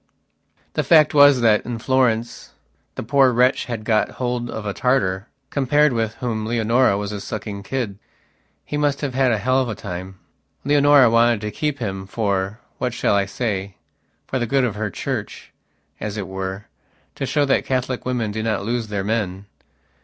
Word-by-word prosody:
The - - 0
fact 155 -3 +5
was 145 -3 +6
that 110 -3 +4
in 120 -1 -4
Florence 120 -2 0 0.4
the - - -4
poor 135 +2 +4
wretch 125 +2 +2
had 115 -3 -5
got 110 -1 +1
hold 120 -1 -2
of 110 -2 -6
a 100 - -2
Tartar, 105 -6 0 0.2
compared 145 +1 +3
with 110 -2 -1
whom 115 -3 -3
Leonora 115 0 +2
was 100 0 -4
a 105 -1 -5
sucking 105 -1 -5
kid. 105 -2 -4 0.7
He 145 - -3
must 145 -1 0
have 140 -3 -2
had 130 -1 +2
a 110 - +2
hell 130 +5 +2
of 125 - -2
a 110 - -3
time. 95 -1 -7 0.5
Leonora 145 -2 +6
wanted 115 -1 +4
to 105 0 -4
keep 150 +6 -2
him 95 -5 -4
forwhat 105 +4 -3
shall 115 - +1
I 100 -1 +2
sayfor 100 +4 -5
the 120 - -1
good 135 +3 +2
of 120 -4 0
her 105 +1 -3
church, - - -5 0.5
as 105 0 -4
it 100 -3 -4
were, 95 +1 -5 0.5
to 135 - -4
show 145 +1 +2
that 135 - +2
Catholic 130 -1 -1
women 120 -4 -1
do 110 +1 -3
not 110 -3 -1
lose 115 0 -2
their 100 -2 -3
men. 100 -3 -2
115 Hz, 175 wpm, -21 LUFS, 105-130 Hz, 0.7 s, was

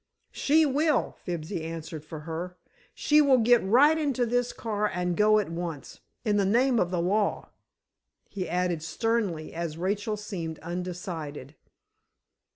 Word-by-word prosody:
"She 310 +2 +3
will," 295 0 +1
Fibsy 170 0 -4
answered 160 -1 -6
for 155 -1 -8
her. 170 +3 -6 0.4
"She 300 0 +4
will 275 -3 +5
get 240 0 +4
right 265 +11 +5
into 280 -6 0
this 245 +1 0
car 210 -2 -2
and 180 0 -1
go 215 +2 +5
at 205 -5 0
once—in 175 - -4
the 200 - +3
name 240 +5 +3
of 175 - +1
the 180 -1 -1
law!" 200 +4 0 0.8
he 185 -3 -5
added 180 -2 0
sternly, 180 -2 -1
as 165 -2 -4
Rachel 205 +4 -1
seemed 175 -6 -5
undecided. 170 -5 -5
190 Hz, 140 wpm, -27 LUFS, 170-230 Hz, 0.8 s, will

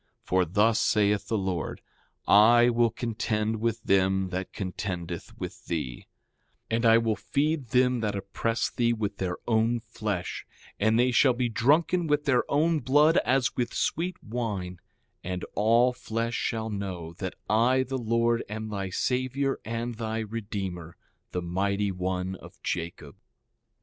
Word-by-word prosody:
For 95 0 +2
thus 105 +6 +3
saith 105 -1 +2
the 110 - 0
Lord: 95 -5 -3 0.5
I 120 +4 +7
will 120 0 +3
contend 110 -1 -2
with 115 -1 -1
them 95 -1 +2
that 95 0 -4
contendeth 90 -3 -5
with - - -7
thee— 70 -7 -4 0.6
6:18 - - +2
And 115 +1 0
I 115 0 +7
will 115 -1 +1
feed 145 +1 -1
them 125 +1 +3
that 105 -2 -1
oppress 100 +4 -2
thee, 120 -1 +1
with 105 -3 -3
their 90 -2 -2
own 115 +1 +2
flesh; 110 -5 -4 0.4
and 110 +2 +3
they 125 +1 +3
shall 125 +2 +5
be 120 0 -1
drunken 160 +9 +2
with 150 0 +1
their 130 -4 +2
own 155 +2 +2
blood 145 +5 +4
as 130 +1 +2
with 120 -1 -2
sweet 180 +2 -1
wine; 105 -6 -4 0.4
and 90 0 -4
all 115 +4 +4
flesh 115 -1 -3
shall 110 -2 -2
know 95 -5 -5
that 95 -2 -4
I 120 +5 +3
the 130 0 -3
Lord 115 0 +1
am 110 +1 -5
thy 100 -2 -3
Savior 130 +6 -1
and 115 +2 -3
thy 110 0 -2
Redeemer, 100 -6 -5 0.3
the 90 - -3
Mighty 100 +3 0
One 90 0 -2
of - - -14
Jacob. 85 -4 -4
110 Hz, 150 wpm, -27 LUFS, 95-120 Hz, 0.6 s, I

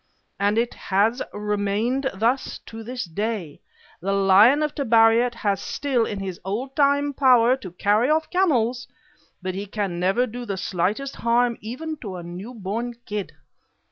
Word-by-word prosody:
And 205 +2 +2
it 235 +1 +1
has 215 +6 +1
remained 210 +6 -1
thus 235 +7 0
to 225 0 -9
this 245 +1 -4
day: 185 -3 -4 0.4
the 195 +3 -1
lion 200 +9 +5
of 300 - -1
Tabariat 235 -2 +4
has 200 -4 -1
still 255 -5 0
all 210 - -4
his 195 -3 -5
old 235 +8 -4
time 285 0 +2
power 255 -3 +5
to 235 -8 -8
carry 210 +7 +2
off 315 +1 +1
camels, 255 -10 +1 0.6
but 185 0 -2
he 200 +2 -5
can 195 -4 -3
never 195 +8 +2
do 245 +1 -7
the 200 -5 -4
slightest 200 +10 -2
harm 235 0 +2
to - - -19
even 310 +6 -5
a 185 -5 -6
new 185 +8 -8
born 230 +4 -4
kid. 210 -2 -4
225 Hz, 160 wpm, -23 LUFS, 200-250 Hz, 0.6 s, lion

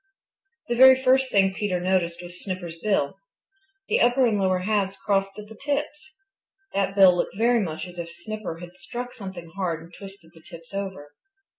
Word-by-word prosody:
The 240 - 0
very 260 +1 +8
first 265 0 +3
thing 195 -1 +3
Peter 190 -3 -1
noticed 175 -1 0
was 175 0 -10
Snipper's 175 -4 -5
bill. 195 -5 0 0.7
The - - +2
upper 245 +2 +4
and 215 -4 +1
lower 185 -1 +2
halves 195 -1 0
crossed 195 -1 0
at 210 0 -9
the 220 - -11
tips. 295 - -4 0.6
That 195 0 0
bill 190 -3 +7
looked 185 - -2
very 235 +2 +3
much 160 -4 -4
as 180 -1 -10
if 170 0 -5
Snipper 180 0 -6
had 175 +1 -11
struck 245 +1 -6
something 190 -6 -9
hard 180 -5 -2
and 170 +1 -16
twisted 195 -4 -12
the 165 - -17
tips 165 +2 -13
over. 190 -7 -5
195 Hz, 180 wpm, -25 LUFS, 175-220 Hz, 0.7 s, very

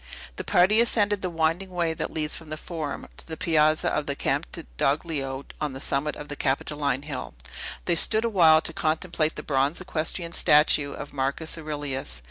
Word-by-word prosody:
The - - -3
party 200 +6 +4
ascended 210 -4 +3
the 185 - -2
winding 165 +3 0
way 170 -3 -1
that - - -3
leads 155 -1 0
from 165 -2 -10
the 155 - -4
Forum 155 -3 -5
to - - -10
the 160 -1 -6
Piazza 155 -2 +2
of 150 - -2
the 140 - -1
Campidoglio 135 - -2 0.2
on 150 -3 -2
the 135 - -7
summit 140 +2 -1
of 150 - -9
the 145 - -4
Capitoline 140 0 -1
Hill. 145 -3 -6 0.5
They 175 - +2
stood 220 +7 +6
awhile 165 -8 +5
to 165 - -3
contemplate 160 0 0
the - - -6
bronze 140 +2 0
equestrian 170 -1 -2
statue 150 -2 +4
of 145 - -8
Marcus 140 +4 -1
Aurelius. 145 - -4
155 Hz, 175 wpm, -25 LUFS, 145-170 Hz, 0.5 s, stood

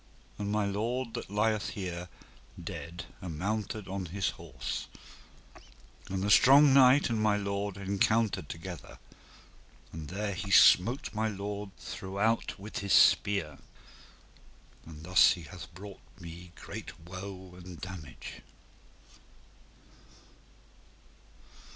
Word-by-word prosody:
And 100 0 -2
my 105 -1 +1
lord 115 +5 -2
that 120 - -5
lieth 105 +1 +1
here 90 -2 -5 0.5
dead 85 +1 -7 0.2
amounted 100 +5 -3
upon 95 -1 -4
his 95 +3 -1
horse, 65 -7 -6 1.2
and 95 0 -2
the 100 - +1
strong 140 +5 +7
knight 135 0 +6
and 110 -2 0
my 105 -1 +3
lord 100 0 -3
encountered 100 -2 +1
together, 85 +2 -8 1.0
and 80 -2 -7
there 100 +3 -3
he 95 +2 -5
smote 115 +8 +5
my 110 +1 0
lord 100 0 -4
throughout 100 +4 -2
with 105 +2 -6
his 100 -3 0
spear, 80 -9 +4 1.3
and 80 -1 -10
thus 90 +2 +6
he 85 - -9
hath 85 +3 -10
brought 100 +1 -10 0.2
me 85 0 -9
in 85 0 -17
great - - -8
woe 95 +1 -8
and 90 -1 -10
damage. 85 -8 -8
100 Hz, 115 wpm, -30 LUFS, 90-105 Hz, 1.3 s, strong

